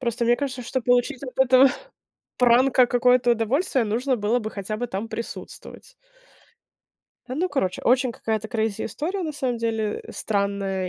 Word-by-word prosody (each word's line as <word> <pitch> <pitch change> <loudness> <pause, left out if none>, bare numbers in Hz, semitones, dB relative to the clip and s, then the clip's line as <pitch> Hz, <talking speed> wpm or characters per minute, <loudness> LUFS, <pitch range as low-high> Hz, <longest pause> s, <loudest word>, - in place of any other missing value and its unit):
Просто 235 -1 -1
мне 240 +1 +3
кажется, 265 -3 -4
что 260 +2 -2
получить 245 +3 +1
от 255 -2 -6
этого 265 0 +6 0.7
пранка 250 +1 +5
какое-то 245 0 +3
удовольствие, 245 - 0
нужно 245 +5 0
было 215 +2 +1
бы 215 -1 -5
хотя 205 +1 -5
бы 245 +3 -3
там 200 +3 -4
присутствовать. 230 - -8 1.3
А, 255 - -4
ну, 350 +6 0
короче. 190 - -1
Очень 255 +1 +3
какая-то 220 -1 -3
крейзи 220 -2 -2
история, 365 +6 -3
на 315 -3 -3
самом 255 -4 -2
деле, 225 -2 -2
э, - - -11
странная, 200 -2 -2
240 Hz, 160 wpm, -24 LUFS, 220-260 Hz, 1.3 s, этого